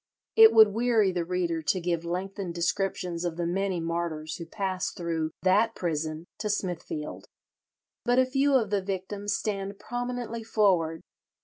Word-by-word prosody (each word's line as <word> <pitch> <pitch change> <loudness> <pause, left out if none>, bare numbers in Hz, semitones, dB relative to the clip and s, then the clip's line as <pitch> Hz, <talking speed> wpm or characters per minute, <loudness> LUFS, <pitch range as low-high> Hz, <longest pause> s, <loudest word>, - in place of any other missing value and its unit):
It 445 0 +9
would 220 -1 +8
weary 225 -2 +2
the 175 -1 -1
reader 170 -2 -1
to 185 +4 +1
give 170 -1 -1
lengthened 180 +1 -4
descriptions 175 0 -1
of 170 -2 -2
the 175 - -1
many 190 +1 0
martyrs 165 -2 -3
who 170 - -8
passed 190 0 -3
through 165 -2 -1
that 210 +5 +3
prison 155 -1 -2
to 210 - -2
Smithfield. 175 -6 -4 0.8
But 245 0 +2
a 260 - +6
few 270 +2 +2
of 220 -6 +2
the 200 -1 +2
victims 200 +2 -3
stand 200 -1 -3
prominently 245 0 -4
forward. 180 -8 +2
190 Hz, 150 wpm, -28 LUFS, 170-215 Hz, 0.8 s, It